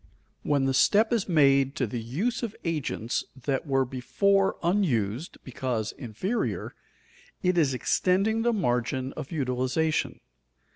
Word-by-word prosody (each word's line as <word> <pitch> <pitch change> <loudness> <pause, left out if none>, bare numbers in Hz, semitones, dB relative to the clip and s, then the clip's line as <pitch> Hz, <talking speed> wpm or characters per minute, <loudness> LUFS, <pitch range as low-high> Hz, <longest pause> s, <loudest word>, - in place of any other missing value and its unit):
When 140 -2 +1
the 135 - +1
step 215 - +4
is 220 -4 0
made 140 -4 +4
to 130 - 0
the 115 +1 -4
use 175 - -2
of 225 -3 -4
agents 150 -8 -2 0.2
that 135 +4 -2
were 135 -1 +2
before 135 +11 +1
unused 150 - 0
because 120 -4 -3
inferior, 145 - -3 0.7
it 180 0 +2
is 145 -6 +2
extending 195 - +1
the 240 +1 +2
margin 130 - -1
of - - -7
utilization. 135 +2 -1
140 Hz, 130 wpm, -27 LUFS, 125-185 Hz, 0.7 s, step